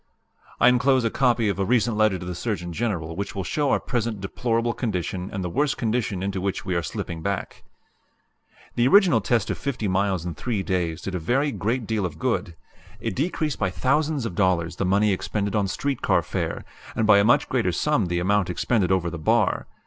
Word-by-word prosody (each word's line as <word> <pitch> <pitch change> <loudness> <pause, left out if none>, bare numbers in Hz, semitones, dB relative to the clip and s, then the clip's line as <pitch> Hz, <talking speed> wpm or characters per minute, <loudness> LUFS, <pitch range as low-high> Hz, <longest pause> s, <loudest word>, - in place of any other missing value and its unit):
"I - - +6
enclose 125 +1 +4
a 115 - 0
copy 120 -4 +2
of 100 -1 -1
a - - +2
recent 115 +1 +2
letter 110 -3 +3
to 90 - -8
the 90 - -4
Surgeon 90 -3 -3
General 85 -7 -2
which 100 +3 -4
will 95 - -2
show 145 +8 0
our - - +3
present 115 -3 -2
deplorable 115 +4 -1
condition 90 - -3
and 95 -4 -4
the - - -2
worse 145 - +1
condition 110 -5 -1
into 95 -1 -2
which 100 0 -2
we 95 - -1
are 85 - +1
slipping 80 +2 -5
back. 100 +2 -4 1.1
"The 120 +1 +2
original 175 - +5
test 115 0 +1
of - - -4
50 125 -6 -2
miles 95 -2 0
in 85 - -3
three 105 +4 -2
days 85 -4 -2
did 95 - -4
a 90 - -1
very 135 - +1
great 115 +3 -2
deal 110 -1 -1
of 80 -3 -11
good. 85 +1 -1 0.4
It - - -3
decreased 155 0 -1
by 95 - +1
thousands 145 - 0
of 105 - -3
dollars 90 -3 +1
the 95 - 0
money 100 +2 +3
expended 100 +2 -2
on 100 -2 +1
street 135 +6 -2
car - - +2
fare, - - -3 0.3
and 110 - +1
by 105 -2 +6
a - - +4
much 120 +4 +4
greater 115 -8 +1
sum 115 - +1
the 85 0 -1
amount 95 +1 +1
expended 95 +1 +1
over 90 -2 +1
the 85 - -6
bar. 75 - +1
100 Hz, 210 wpm, -24 LUFS, 90-120 Hz, 1.1 s, I